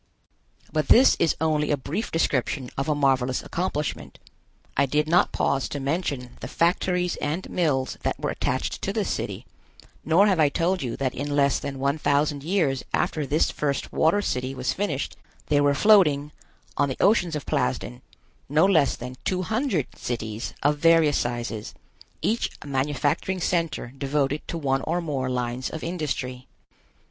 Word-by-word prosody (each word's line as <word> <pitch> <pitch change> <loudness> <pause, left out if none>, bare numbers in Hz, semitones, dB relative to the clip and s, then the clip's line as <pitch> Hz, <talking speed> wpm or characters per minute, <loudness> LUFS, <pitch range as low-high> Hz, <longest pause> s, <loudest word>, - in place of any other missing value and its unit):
But 155 -3 0
this 260 +3 +7
is 165 - +2
only 155 -2 +1
a 145 - +2
brief 150 - -4
description 135 -4 0
of 135 +3 -2
a 150 - +2
marvelous 130 -3 +1
accomplishment. 155 -4 -3 0.6
I 140 0 +3
did 150 +3 +1
not 170 +3 +3
pause 135 -1 0
to 145 - -4
mention 140 -4 -3
the - - -6
factories 180 +1 +1
and 155 +5 -3
mills 140 -7 0
that - - -2
were - - -1
attached - - -2
to - - -2
this - - -1
city, - - -4 0.6
nor 165 +6 +4
have 190 -5 +2
I 150 -2 +5
told 180 +5 0
you 120 -3 -3
that 130 -2 -1
in 145 +2 -3
less 140 -1 +3
than 140 -1 -5
one 140 +3 0
thousand 145 0 +1
years 155 -7 0
after 150 -3 -1
this 150 +4 +2
first 140 -2 -2
water 170 +6 +3
city 130 -3 -2
was 125 -3 -1
finished, 170 -9 -3 0.3
there 145 -1 +4
were 145 0 +3
floating, 150 -7 +4 0.5
on 140 -1 +2
the 130 - -4
oceans 180 -6 +3
of 150 - -4
Plasden, 60 -1 -2 0.5
no 155 +5 +4
less 160 -8 +3
than 125 +1 -8
two 185 -1 -1
hundred 220 - 0
cities 115 -2 -4
of 145 +1 +2
various 165 -2 +4
sizes, 120 -3 -4 0.5
each 230 +2 +1
a - - -13
manufacturing 145 +6 -1
center 165 -8 -1
devoted 140 +1 0
to 170 - -3
one 135 -3 0
or 170 +5 -1
more 140 -6 -2
lines 125 0 -2
of 160 - -6
industry. 135 -7 -3
145 Hz, 165 wpm, -25 LUFS, 135-165 Hz, 0.6 s, this